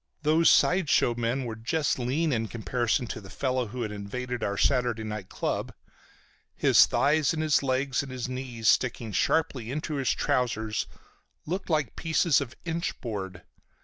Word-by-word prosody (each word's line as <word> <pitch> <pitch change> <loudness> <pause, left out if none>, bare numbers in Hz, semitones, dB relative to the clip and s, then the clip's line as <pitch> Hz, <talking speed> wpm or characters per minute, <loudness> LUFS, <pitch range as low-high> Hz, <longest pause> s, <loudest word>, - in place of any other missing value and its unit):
Those 160 +2 +4
side 180 -4 +4
show 120 - +3
men 120 +3 -1
were 115 -2 -4
just 140 +6 -1
lean 140 +5 0
in 115 -1 -1
comparison 120 +2 -1
to 110 - -6
the 95 - -12
fellow 130 0 -1
who 120 +3 -4
had 105 - -4
invaded 120 +4 -5
our 100 0 -1
Saturday 120 -4 +1
night 105 -3 -6
club. - - -3 0.8
His - - +6
thighs 150 +1 +2
and 155 - -1
his 155 -2 +3
legs 130 -1 0
and 140 -2 -8
his 125 -1 -4
knees, 125 -3 -4
sticking 115 -3 +2
sharply 125 - 0
into 150 +2 -3
his 135 -3 0
trousers, 110 -4 0 0.6
looked 185 +5 -4
like 155 -3 0
pieces 160 -2 +2
of 130 -3 -6
inch 170 +1 -3
board. 95 -7 -5
125 Hz, 165 wpm, -27 LUFS, 115-145 Hz, 0.8 s, His